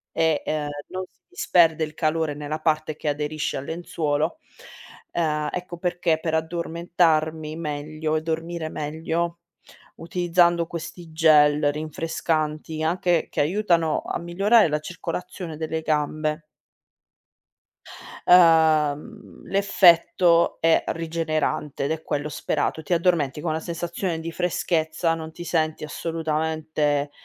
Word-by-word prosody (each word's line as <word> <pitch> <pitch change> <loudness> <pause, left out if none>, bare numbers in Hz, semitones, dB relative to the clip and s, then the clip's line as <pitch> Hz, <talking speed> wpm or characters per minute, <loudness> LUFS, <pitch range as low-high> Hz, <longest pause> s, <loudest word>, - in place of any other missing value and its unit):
e 160 -2 +2
ehm, 150 -1 -2 0.2
non 185 0 -4
si - - -40
disperde 165 - +3
il 155 - -11
calore 155 -1 0
nella 150 +1 -5
parte 155 -1 0
che - - -6
aderisce 150 +1 -2
al 135 - -6
lenzuolo, 160 - -2 0.7
ehm, 150 -3 0
ecco 180 -1 -5
perché 175 -2 0
per 160 0 -3
addormentarmi 160 -1 0
meglio 155 0 -3
e 155 - -2
dormire 165 0 -3
meglio, 165 +3 -3 0.6
utilizzando 175 0 +2
questi 170 0 -8
gel 150 -2 +5
rinfrescanti, 155 0 -2
anche 175 0 +1
che - - -4
aiutano 170 -1 +1
a - - -3
migliorare 195 +5 +3
la 150 0 0
circolazione 175 +1 -6
delle 160 0 -3
gambe. 155 0 -1 1.8
Uhm, 160 +2 +4
l'effetto 175 -3 +4
è 165 0 +4
rigenerante 160 -3 -2
ed - - -1
è 160 0 -2
quello 145 +1 -2
sperato. 155 +1 -2
Ti 175 - -1
addormenti 165 -5 +1
con 160 0 -1
la 160 - -1
sensazione 170 +1 -3
di 165 +1 -5
freschezza, 165 -1 0
non 160 -1 -7
ti 175 - -9
senti 155 -3 -1
assolutamente, 155 -2 -1
160 Hz, 120 wpm, -24 LUFS, 155-170 Hz, 1.8 s, gel